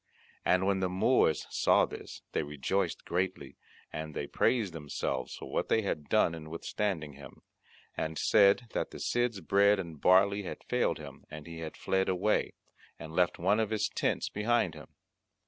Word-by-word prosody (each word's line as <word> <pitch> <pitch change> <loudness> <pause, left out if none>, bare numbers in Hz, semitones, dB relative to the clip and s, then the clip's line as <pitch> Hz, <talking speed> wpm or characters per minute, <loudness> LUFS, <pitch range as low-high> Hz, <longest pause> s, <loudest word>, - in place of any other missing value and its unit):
And 90 +1 +3
when 100 -1 +2
the 95 -1 0
Moors 95 -2 +2
saw - - +4
this - - -9
they - - 0
rejoiced 75 +7 -2
greatly, 90 +2 -2 0.4
and 80 -1 -5
they 70 - -2
praised 105 - +1
themselves 70 -4 -3
for - - -9
what - - -1
they 110 - +3
had 75 -7 -3
done 85 - +3
in 80 -1 -8
withstanding 80 -2 -3
him, 70 +1 -13 0.5
and 80 0 -3
said 100 +2 +5
that - - -1
the - - -10
Cid's 120 -4 0
bread 100 +4 +4
and 85 -6 -7
barley 100 +2 +5
had 95 - -7
failed - - 0
him, - - -11
and 75 -1 -9
he 85 -1 -8
had 80 -1 -7
fled 95 0 0
away, 95 +3 +1 0.4
and 80 0 -9
left 90 0 +2
one 100 +5 +2
of 110 -2 +1
his 110 -2 0
tents - - -1
behind 115 +3 +1
him. - - -11
95 Hz, 175 wpm, -31 LUFS, 80-100 Hz, 0.5 s, said